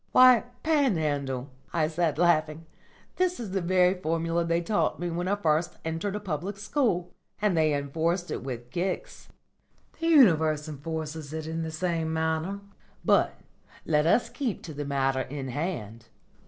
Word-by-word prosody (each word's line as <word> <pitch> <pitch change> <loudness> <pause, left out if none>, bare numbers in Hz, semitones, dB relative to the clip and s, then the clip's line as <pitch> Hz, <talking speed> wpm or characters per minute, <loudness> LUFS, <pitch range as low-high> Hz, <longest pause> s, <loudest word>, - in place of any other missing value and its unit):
_'" - - -49
"Why, 255 -2 +7 0.2
Panhandle," 150 - 0 0.2
I 160 -2 +1
said 160 -2 0
laughing, 165 -2 +2 0.5
"that 365 -1 +1
is 220 -5 -5
the 195 0 0
very 180 +1 +4
formula 165 -1 -1
they 170 0 +1
taught 205 +5 0
me 175 0 -2
when 175 +2 -2
I 200 - +2
first 170 -2 0
entered 165 +5 -2
a - - -2
Public 195 +1 -4
School. 205 - 0 0.3
And 210 -3 +2
they 155 -1 +3
enforced 160 +5 -1
it - - -4
with 125 -2 -6
kicks." 180 +3 -3 0.7
"The 330 - -1
Universe 160 - +5
enforces 155 0 -5
it 160 -1 -4
in 160 +1 -3
the 160 - -3
same 160 0 -1
manner. 160 +5 -1 0.4
But - - +3 0.5
let 150 0 +2
us 230 +6 +3
keep 245 -3 -3
to 160 - -7
the 145 0 -4
matter 135 -1 +1
in 135 0 -5
hand. 120 - -4
165 Hz, 160 wpm, -27 LUFS, 150-185 Hz, 0.7 s, Why